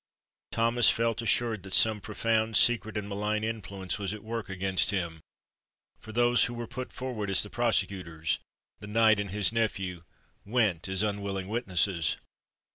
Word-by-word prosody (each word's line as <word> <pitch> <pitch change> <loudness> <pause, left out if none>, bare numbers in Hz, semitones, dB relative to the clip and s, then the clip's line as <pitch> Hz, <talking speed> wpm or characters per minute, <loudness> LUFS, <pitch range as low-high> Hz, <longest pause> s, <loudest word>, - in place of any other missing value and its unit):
Thomas 115 0 +4
felt 115 0 +1
assured 115 -1 +1
that 95 0 -3
some 110 -2 +4
profound, 110 +2 0
secret, 110 -2 +3
and 105 -1 -3
malign 105 +1 -2
influence 100 -4 -4
was 100 +1 -3
at 105 - -11
work 115 -1 -5
against 95 0 +2
him; 85 -5 -2 0.8
for 110 - -10
those 120 +1 +4
who 120 - -5
were 120 0 -4
put 125 +3 -7
forward 125 -6 -4
as 95 - +5
the 105 - -7
prosecutors—the 95 -4 -2
knight 110 0 +4
and 105 -1 -3
his 100 +1 0
nephew—went 100 -1 -2
as 95 +2 0
unwilling 100 -2 -2
witnesses! 95 - 0
105 Hz, 145 wpm, -29 LUFS, 95-115 Hz, 0.8 s, as